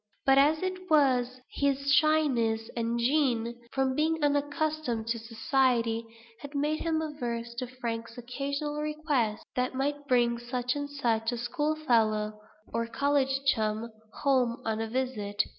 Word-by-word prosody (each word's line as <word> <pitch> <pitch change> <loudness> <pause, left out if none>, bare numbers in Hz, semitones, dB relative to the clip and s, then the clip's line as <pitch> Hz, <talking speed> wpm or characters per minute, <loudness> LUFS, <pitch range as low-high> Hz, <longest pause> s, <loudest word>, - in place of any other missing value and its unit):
But, 270 0 +6
as 305 +4 +4
it 370 0 -4
was, 255 -4 +3
his 280 0 0
shyness 255 -8 +2
and 235 0 -1
gêne, 240 -3 +2 0.2
from 265 -1 +1
being 315 +2 +1
unaccustomed 290 -4 0
to 230 0 0
society, 230 0 +1 0.3
had 285 0 -9
made 300 +2 0
him 320 -1 0
averse 240 -6 -4
to 255 - -3
Frank's 235 -2 -5
occasional 280 +4 -3
requests 300 -8 -1
that 250 0 0
he - - -6
might 285 +1 -2
bring 240 -2 +3
such 245 +1 -2
and 285 0 -3
such 230 -5 0
a 240 - -3
school 295 +6 -1
fellow, 215 -7 +1 0.3
or 230 0 0
college 270 +1 +1
chum, 220 -3 +1 0.3
home 255 -3 +2
on 220 0 -1
a 225 - -2
visit. 220 -5 -1
255 Hz, 145 wpm, -29 LUFS, 230-290 Hz, 0.3 s, But